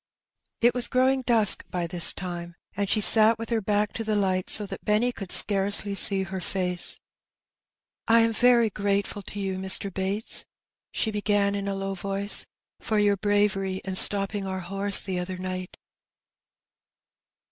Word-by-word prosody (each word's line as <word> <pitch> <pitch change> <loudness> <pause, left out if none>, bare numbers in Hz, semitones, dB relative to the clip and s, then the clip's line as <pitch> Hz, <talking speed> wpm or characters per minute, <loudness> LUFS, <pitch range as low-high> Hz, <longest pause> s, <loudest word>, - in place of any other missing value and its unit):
It 240 +1 +3
was 245 -1 0
growing 260 +1 0
dnsk 225 -5 +3
by 175 -1 -4
this 170 0 +5
time^ 175 -2 -8 0.2
and 200 -1 -3
she 215 - +1
sat 220 +2 +5
with 230 +1 -9
her 225 -1 -1
back 210 0 -2
to 225 - -6
the 215 -1 -3
lights 185 -2 -1
so 210 - +2
that - - -10
Benny 215 +4 0
could 195 -6 -10
scarcely 200 0 +3
see 195 -1 +3
her 190 0 -7
face. 180 -1 -3 0.5
" - - -69 0.3
I 230 0 +4
am 225 0 0
very 235 -1 +2
gratefal 200 0 -3
to 205 - -7
you, 190 -1 -4
Mr. 190 0 +1
Bates,*^ 195 +3 -2 0.5
she 220 - -3
began 205 -1 -1
in 200 0 -5
a 200 - -3
low 195 0 -5
voice, 195 +2 +2 0.3
'^ - - -25
for 220 - -2
your 205 -1 +1
bravery 195 -2 -2
in 190 - -5
stopping 195 +1 +3
our 190 0 -5
horse 195 +2 +3
the 185 -2 -5
other 180 +1 -6
night." 185 0 -7
200 Hz, 170 wpm, -24 LUFS, 190-215 Hz, 0.5 s, this